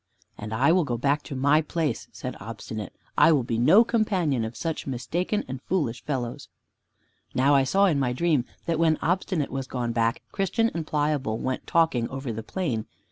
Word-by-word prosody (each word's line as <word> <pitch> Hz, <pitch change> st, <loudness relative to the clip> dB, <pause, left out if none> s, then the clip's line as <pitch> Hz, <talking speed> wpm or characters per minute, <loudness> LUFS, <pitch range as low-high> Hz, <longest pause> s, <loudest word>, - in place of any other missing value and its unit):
"And 105 Hz, +1 st, -7 dB
I 130 Hz, +8 st, +3 dB
will 180 Hz, 0 st, +4 dB
go 120 Hz, -5 st, -2 dB
back 145 Hz, +4 st, +1 dB
to 140 Hz, -, -6 dB
my 145 Hz, +4 st, +4 dB
place," 155 Hz, -5 st, -2 dB
said -, -, -6 dB
Obstinate. 110 Hz, -1 st, -6 dB, 0.3 s
"I -, -, +7 dB
will 145 Hz, -5 st, +3 dB
be 115 Hz, -1 st, -2 dB
no 175 Hz, -, +7 dB
companion 190 Hz, -, +1 dB
of 110 Hz, 0 st, -5 dB
such 165 Hz, -3 st, -3 dB
mistaken 165 Hz, -, -1 dB
and 130 Hz, 0 st, -6 dB
foolish 145 Hz, -11 st, -1 dB
fellows." 130 Hz, -1 st, -4 dB, 0.9 s
Now 135 Hz, +3 st, +4 dB
I 135 Hz, -1 st, +5 dB
saw 195 Hz, +8 st, +3 dB
in 160 Hz, -7 st, +2 dB
my 130 Hz, -2 st, +1 dB
dream 145 Hz, -1 st, +1 dB, 0.2 s
that 165 Hz, -1 st, 0 dB
when 160 Hz, -2 st, +3 dB
Obstinate 180 Hz, -3 st, 0 dB
was 135 Hz, -1 st, -3 dB
gone 120 Hz, -3 st, -2 dB
back, 115 Hz, 0 st, 0 dB
Christian 225 Hz, +4 st, +1 dB
and 165 Hz, -2 st, -4 dB
Pliable 145 Hz, -7 st, 0 dB
went 130 Hz, +2 st, -3 dB
talking 160 Hz, -9 st, +2 dB
over 135 Hz, -3 st, -4 dB
the 110 Hz, -, -4 dB
plain. 120 Hz, -, -3 dB
140 Hz, 190 wpm, -26 LUFS, 120-165 Hz, 0.9 s, I